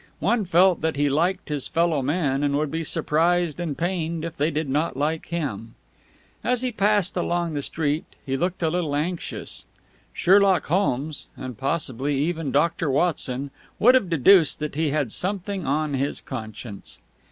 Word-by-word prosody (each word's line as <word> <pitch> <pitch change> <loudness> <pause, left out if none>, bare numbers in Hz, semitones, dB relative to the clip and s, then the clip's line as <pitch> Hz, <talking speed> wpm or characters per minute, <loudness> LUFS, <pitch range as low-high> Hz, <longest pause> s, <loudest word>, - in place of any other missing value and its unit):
One 230 -4 +1
felt 180 +1 +4
that 160 -1 0
he 145 0 +2
liked 170 +6 0
his 145 -3 -2
follow 165 -3 +1
men 140 -1 0
and 140 -1 +1
would 150 -1 -1
be 165 +1 -2
surprised 165 +1 +1
and 160 -5 -3
pained 170 -2 -2
if 165 -1 -6
they 150 0 +1
did 155 -1 -2
not 145 +1 -1
like 155 +3 -1
him. 115 -10 -4 0.7
As 250 0 +1
he 255 - 0
passed 205 -3 +2
along 175 -2 -1
the 145 - -2
street, 150 +1 -2 0.2
he 135 -2 -1
looked 175 +5 -1
a 160 - +2
little 165 -4 -1
anxious. 165 +4 -3 0.5
Sherlock 195 -2 +4
Holmes 155 -4 -1
and 130 -2 -6
possibly 140 0 -1
even 160 +1 -1
Doctor 165 +2 +1
Watson 140 -3 0 0.3
would 245 +4 +6
have 255 -9 +3
deduced 165 +1 +5
that 150 0 -4
he 155 +1 0
had 145 -5 -1
something 190 - -2
on 150 +1 0
his 140 +2 -1
conscience. 110 -4 -7
160 Hz, 165 wpm, -24 LUFS, 140-175 Hz, 0.7 s, would